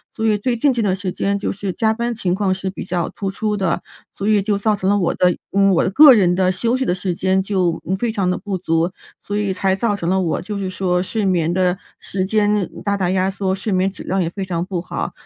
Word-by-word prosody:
所 225 - -2
以 215 -2 +3
最 240 +4 -1
近 275 +4 +2
这 240 -2 -1
段 195 -3 +1
时 190 -1 -4
间 200 +2 -1
就 200 - -2
是 195 -1 -4
加 220 +2 +1
班 235 +1 -2
情 185 -5 -1
况 190 0 +1
是 190 0 -3
比 190 - -7
较 175 -2 -2
突 195 -1 -4
出 210 +2 -2
的， 190 -4 -1 0.3
所 200 - -5
以 210 -1 +3
就 205 0 0
造 210 +1 +1
成 190 -2 -1
了 205 - +3
我 180 -4 +1
的 180 -1 +2 0.4
我 170 - +3
的 - - +1
个 290 +4 +9
人 185 -6 +3
的 185 0 +2
休 230 +7 +1
息 260 - -1
的 175 - +1
时 185 0 -2
间 190 +2 +1
就 185 -4 0 0.2
非 235 -2 0
常 195 -4 0
地 180 - 0
不 205 -3 -4
足。 165 0 0 0.3
所 205 - -5
以 205 -2 0
才 190 0 +1
造 205 +1 0
成 170 -4 -3
了 190 +1 +2
我， 165 -3 -1
就 205 +1 -5
是 190 -1 -3
说 180 -1 0
睡 210 +3 -2
眠 170 -4 +1
的 180 0 +1 0.2
时 185 -1 -3
间 210 -1 +1
大 200 -1 0
大 185 -3 0
压 185 +1 +1
缩， 190 -1 -1
睡 205 +2 -4
眠 185 +1 +2
质 - - -10
量 190 +1 -1
也 170 - 0
非 195 +2 -5
常 170 -2 -2
不 185 -2 -3
好。 180 - -4
190 Hz, 285 characters per minute, -19 LUFS, 185-210 Hz, 0.4 s, 个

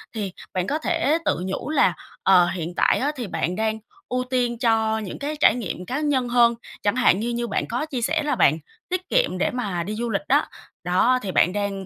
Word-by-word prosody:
Thì 200 -4 -3 0.2
bạn 185 0 -1
có 295 - 0
thể 325 -1 +1
tự - - +1
nhủ 190 +9 -4
là, 270 - +3 0.3
ờ, 180 -2 +6
hiện 175 -1 -4
tại - - +3
á, 285 +3 0
thì 245 -5 -5
bạn 180 -1 -2
đang 220 0 -1 0.3
ưu 255 0 0
tiên 250 -2 -1
cho 225 -2 +2
những 205 -4 -7
cái 295 +2 -3
trải 235 - +5
nghiệm 190 -6 -5
cá 260 +9 -3
nhân 280 -5 +1
hơn. 235 -1 +4 0.3
Chẳng 205 +2 +1
hạn 225 -6 +4
như 235 +3 -2
như 235 0 -2
bạn - - -2
có 245 +6 -2
chia 270 -6 -4
sẻ 310 +6 0
là 290 -2 0
bạn 155 - +4 0.3
tiết 365 0 -3
kiệm - - +2
để - - 0
mà 200 -8 -2
đi 210 +5 -4
du 235 +2 -3
lịch 200 - 0
đó, - - +4 0.4
đó, 185 +9 +3
thì 195 -2 -4
bạn 180 - +3
đang 200 -1 -3
235 Hz, 235 wpm, -23 LUFS, 195-255 Hz, 0.4 s, ờ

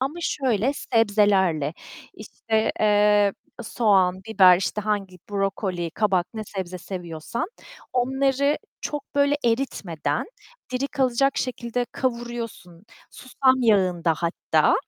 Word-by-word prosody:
ama 270 +4 -1
şöyle, 260 - 0
sebzelerle, 200 - +2 0.4
işte, 220 -1 -2
eee, 210 -1 +4 0.3
soğan, 190 -5 +2
biber, 185 -4 +7
işte, 195 +3 -2
hangi 200 -3 -2
brokoli, 195 -3 -2
kabak, 190 -2 +1
ne 215 -1 -5
sebze 185 -2 -6
seviyorsan 175 - -5 0.5
onları 270 +3 +1 0.2
çok 295 -2 -6
böyle 285 0 +3
eritmeden, 180 - -1 0.5
diri 260 +2 0
kalacak 265 0 +1
şekilde 245 -1 -2
kavuruyorsun, 235 -8 -5 0.3
susam 260 0 +1
yağında 180 -7 +2
hatta. 170 +1 +1
210 Hz, 100 wpm, -24 LUFS, 185-250 Hz, 0.5 s, biber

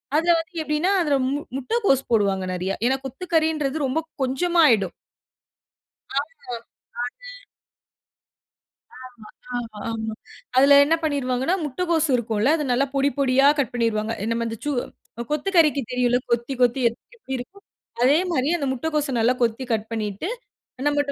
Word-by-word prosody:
அதுல 335 +3 +4
வந்து 330 +3 -8
எப்டின்னா, 300 +5 0
அதுல 295 -4 +2
மு 285 - -1 0.2
முட்டகோஸ் 275 - +1
போடுவாங்க 195 -3 +2
நெறையா. 185 +2 -2
ஏன்னா 265 +2 +2
கொத்துக்கறின்றது 315 -1 0
ரொம்ப 270 +5 0 0.2
கொஞ்சமா 335 +7 +2
ஆயிடும். 200 -6 +2 1.2
ஆமா. 285 -3 -4 0.5
அது. - - -9 2.1
ஆமா, 250 - -20
ஆமா, 225 -3 -7
ஆமா. 220 -1 -4 0.4
அதில 280 +2 +7
என்னபண்ணிருவாங்கனா 285 -2 0
முட்டைகோஸ்சு 325 +1 0
இருக்கும் 225 -3 -2
இல்ல 245 +7 +3
அத 300 - -2
நல்லா 270 +3 +2
பொடி 275 0 +3
பொடியா 270 0 +4
கட் 270 -2 0
பண்ணிருவாங்க. 230 -2 0
இந்த 230 - 0
மாரி 230 -1 -3
சு 295 - -1 0.6
கொத்துக்கறிக்கு 305 -2 +3
தெரியும் 250 0 +2
இல்ல 245 - +3
கொத்தி, 235 +3 0
கொத்தி 245 +2 +3
எப்டி 235 - -14
எப்டி 350 - -9
இருக்கும். 385 +11 -11 0.4
அதே 280 +5 +5
மாரி 270 -3 +1
அந்த 285 - -3
முட்டைகோச 295 +1 -1
நல்லா 230 +2 +4
கொத்தி 235 +2 0
கட் 220 -1 0
பண்ணிட்டு, 210 - -3 0.6
நம்மட்ட 290 -1 +1
270 Hz, 140 wpm, -23 LUFS, 235-310 Hz, 2.1 s, அதில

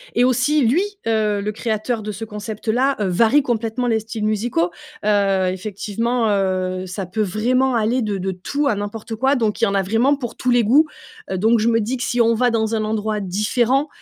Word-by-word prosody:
et 240 - +4
aussi 255 +3 +2
lui, 310 - +3 0.2
heu, 215 -2 +1
le 210 +1 -2
créateur 220 +1 -2
de 210 0 -5
ce 210 +3 -6
concept-là, 220 +5 -1
heu, 205 - 0
varie 225 +10 +4
complètement 235 0 -1
les 225 -1 +2
styles 220 0 -5
musicaux, 215 -5 0 0.3
heu, 195 -3 +2
effectivement, 215 +5 -2
heu, 185 -2 0
ça 190 +1 -5
peut 215 +5 -3
vraiment 245 +6 +1
aller 230 +3 +1
de 210 -3 -2
de 190 0 -2
tout 280 +11 -2
à 225 - +2
n'importe 210 +2 -5
quoi. 265 +5 +2
Donc 225 -3 -1
il - - 0
y - - +1
en 200 - -1
a 195 - +3
vraiment 230 +9 +2
pour 245 -4 -6
tous 255 - -2
les 240 -1 +4
goûts, 285 +9 +4 0.4
heu, 190 - -1
donc 220 +4 +3
je 220 - +1
me 230 -1 +3
dis 225 +4 -2
que 245 - -4
si 245 -3 -1
on 230 0 +4
va 245 +2 +2
dans 225 -1 0
un 215 - -1
endroit 215 0 -1
différent, 230 - +1
220 Hz, 220 wpm, -20 LUFS, 205-245 Hz, 0.4 s, et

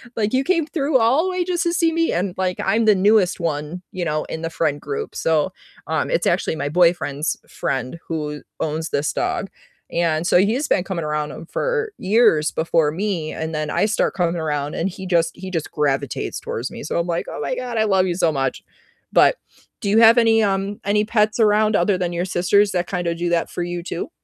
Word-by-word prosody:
Like, 215 0 -1
"You 260 +1 +2
came 335 +1 +1
through 290 -2 +1
all 250 +6 +3
the - - 0
way 365 -1 -1
just 350 -1 -1
to 340 - 0
see 335 -1 +2
me?" 330 0 +1
And, 180 +1 -1
like, 185 -1 -1
I'm 225 0 +2
the 215 - +6
newest 195 -1 +3
one, 165 +1 -3
you 180 -2 -3
know, 155 -1 -1
in 160 - -6
the 165 - -3
friend 150 -3 -1
group, 140 -1 -4
so, 160 +3 +1 0.3
um, - - -1
it's - - 0
actually - - +1
my 145 -2 -3
boyfriend's 165 -3 +1
friend 130 +5 -3
who 150 -2 -4 0.2
owns 160 +1 -2
this 145 +1 -1
dog, 195 - -2 0.4
and 170 0 0
so - - +5
he's 225 +10 +2
been 180 - +2
coming 180 -3 -4
around 150 0 -2
him 165 - -10
for 445 - -2
years 190 -6 +3
before 160 -2 +1
me, 175 -3 -2
and 160 0 -4
then 155 0 -2
I - - +2
start 215 - 0
coming 175 -2 0
around 150 -2 -2
and 170 - -1
he 190 0 -7
just 170 -2 +1
he 190 0 -7
just 165 -4 -3
gravitates 140 -3 -1
towards 120 +3 -4
me. - - -9
So 155 - -2
I'm 170 - -1
like, 170 -1 -1
"Oh - - -6
my 240 - -2
god, 250 -1 -5
I 220 - +3
love 190 -3 +3
you 180 - 0
so 170 -2 +1
much." 135 -3 -2 0.5
But - - +5 0.4
do 200 - -1
you 210 - +3
have 230 +1 +7
any, 225 -1 +4
um 195 0 -1
any 210 +1 +2
pets 215 0 +1
around 215 0 +3
other 185 +2 +2
than 175 -1 -2
your 175 +1 -1
sister's 190 +3 +2
that 180 -2 0
kinda 175 -3 -2
do 175 +1 -2
that 170 -1 0
for 175 - -4
you 175 0 -4
too? 170 0 -5
180 Hz, 225 wpm, -21 LUFS, 160-215 Hz, 0.5 s, have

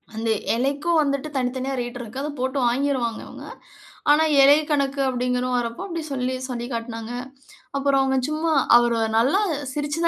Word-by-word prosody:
அந்த 225 +1 -2 0.3
இலைக்கும் 285 +7 +1
வந்துட்டு 280 0 -1
தனித்தனியா 260 +1 -2
ரேட் 240 +1 -6
இருக்கு. 240 +3 -6
அத 300 - -3
போட்டு 260 +2 -1
வாங்கிருவாங்க 250 -3 -1
இவங்க. - - -10 0.6
ஆனா, 300 +2 +6 0.2
இலை 280 +1 +8
கணக்கு 280 -2 0
அப்டிங்கிறது 250 0 -1
வரப்போ 235 +3 -4
அப்டி 335 -3 -4
சொல்லி 255 0 -1
சொல்லி 240 -1 -4
காட்னாங்க. 230 -1 -5 0.7
அப்புறம் 275 0 +2
அவங்க 265 0 +1
சும்மா 310 +2 -1 0.2
அவர் 240 0 +4 0.2
நல்லா 260 - +3 0.3
சிரிச்சு 295 +3 -3
தான் - - +6
260 Hz, 155 wpm, -23 LUFS, 240-285 Hz, 0.7 s, இலை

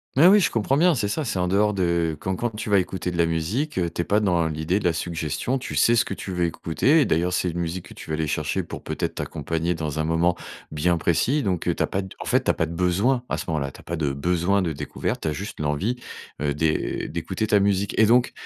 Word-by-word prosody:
Mais 145 +6 +6
oui, 205 +3 +7
je 195 - +2
comprends 115 +4 +1
bien, 175 +1 +4
c'est 110 -5 0
ça, 155 +8 -2
c'est 110 - -2
en 90 0 +1
dehors 105 +3 +2
de 85 -4 +1
quand 95 0 -2
quand 120 +6 -1
tu 105 0 -4
vas 100 - +6
écouter 90 0 -3
de 85 - -5
la 85 -1 +3
musique, 100 - -1
heu, 85 -2 +1
tu 85 - -3
es - - -1
pas 105 - +3
dans 90 -6 +2
l'idée 80 +5 -1
de - - -8
la 85 - +3
suggestion, 80 - -2
tu 130 - -6
sais 120 - +4
ce 120 - +3
que 100 - -4
tu 95 - -6
veux 90 -1 +1
écouter 85 - +2
et - - +3
d'ailleurs 90 +3 +1
c'est 90 -1 0
une 85 - -4
musique 85 +1 -4
que - - -11
tu - - -11
vas 80 - 0
aller 80 - -1
chercher 75 - -1
pour - - -8
peut-être - - -3
t'accompagner 85 +1 -2
dans 80 -2 -3
un - - +1
moment 85 +2 +2 0.4
bien 85 +3 +1
précis 115 - +1
donc, 95 -5 -1
heu, - - +2
tu - - 0
as - - 0
pas 95 - -1
d 95 - -8
en - - -6
fait, - - +2
tu - - 0
as - - +5
pas 80 - +1
de 80 - -7
besoin 95 +9 +1
à - - -1
ce - - -5
moment-là, 70 -4 -1
tu - - -14
as - - -14
pas 85 - -4
de 75 -3 0
besoin 90 +7 +1
de 85 -3 -1
découverte, 70 - -3
tu - - -2
as 75 - 0
juste 100 +5 -6
l'envie, 75 +11 -1 0.4
heu, 75 -1 +1
d'é 80 +1 0
d'écouter 85 +6 -2
ta 105 -1 +3
musique 100 0 +1
et 110 - +7
donc, 120 +2 +4
90 Hz, 285 wpm, -24 LUFS, 80-105 Hz, 0.4 s, oui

